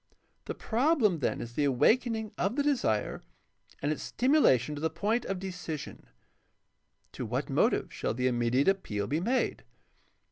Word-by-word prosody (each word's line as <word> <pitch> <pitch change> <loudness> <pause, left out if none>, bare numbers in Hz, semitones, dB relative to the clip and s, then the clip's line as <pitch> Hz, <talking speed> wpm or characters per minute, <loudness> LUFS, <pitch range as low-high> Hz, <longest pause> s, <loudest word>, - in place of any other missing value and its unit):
The - - -4
problem 235 - +2
then - - -1
is 120 0 -7
the 145 - +1
awakening 220 - +2
of 195 +6 -1
the 285 - +1
desire 240 - 0 0.6
and 145 - +1
its 155 - -3
stimulation 240 - +3
to 145 - -6
the 160 - +1
point 210 +9 -1
of 195 - -2
decision. 180 -5 -6 1.0
To - - -6
what - - -3
motive - - +1
shall - - -2
the 125 +1 -1
immediate 125 +2 +2
appeal 120 - 0
be 150 +8 -1
made 245 +8 0
175 Hz, 150 wpm, -29 LUFS, -, 1.0 s, stimulation